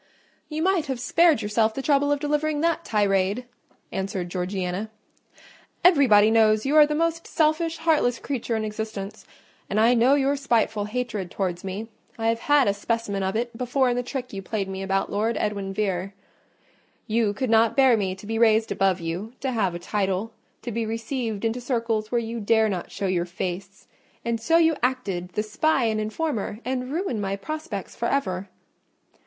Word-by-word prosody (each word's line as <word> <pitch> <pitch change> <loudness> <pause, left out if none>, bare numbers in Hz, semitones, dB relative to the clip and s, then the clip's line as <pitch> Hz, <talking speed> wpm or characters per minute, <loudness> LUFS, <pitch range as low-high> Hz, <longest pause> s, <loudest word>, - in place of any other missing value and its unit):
"You 310 0 -2
might 370 -4 +2
have 265 -3 -3
spared 325 +4 +3
yourself 220 +1 +1
the 270 - -4
trouble 285 0 +3
of 290 - +1
delivering 295 0 0
that 335 0 +1
tirade," 200 - +1 0.5
answered 190 -2 -3
Georgiana. 185 +2 -3 0.9
"Everybody 245 - +6
knows 215 0 +4
you 280 +3 +1
are 300 -1 +8
the 300 - -1
most 330 +1 -1
selfish, 325 +1 +1
heartless 310 -7 +2
creature 240 -4 -3
in 220 -1 -1
existence: 210 -2 -6 0.4
and 210 - +1
I 230 +3 +5
know 250 +4 +4
your 280 0 +2
spiteful 225 -6 +1
hatred 215 -4 -3
towards 180 -2 -3
me: 195 +4 -5 0.3
I 225 0 +1
have 230 0 0
had 290 +1 +3
a 200 - +3
specimen 205 -1 -2
of 190 +1 -1
it 235 +1 -2
before 250 +2 +1
in - - 0
the 245 - 0
trick 250 -1 -6
you 195 - -4
played 195 0 -3
me 190 0 -5
about 195 0 -1
Lord 220 +2 0
Edwin 200 -2 -2
Vere: 195 -1 -2 0.9
you 220 -2 +1
could 235 +3 -2
not 225 +2 +4
bear 265 -3 +6
me 190 -3 -1
to 190 - -13
be 225 +1 -2
raised 220 -1 +4
above 190 -1 +2
you, 175 +8 -4
to 265 - -1
have 195 -7 0
a - - -2
title, 195 +3 -2 0.3
to 240 - -4
be 230 +1 -1
received 225 -1 -3
into 230 +2 -1
circles 230 -3 -1
where 245 - +2
you 230 0 -3
dare 220 +1 +3
not 185 -4 -4
show 200 - -4
your 180 -2 0
face, 185 +2 -5 0.4
and 230 -1 -1
so 330 +7 +3
you 325 -1 +4
acted 205 -9 -1
the 210 - 0
spy 265 +6 +1
and 220 -1 +1
informer, 215 -1 -2
and 255 0 -2
ruined 315 - -2
my 195 0 -1
prospects 235 - -6
for 235 - -1
ever." 195 -9 -1
225 Hz, 185 wpm, -25 LUFS, 200-265 Hz, 0.9 s, are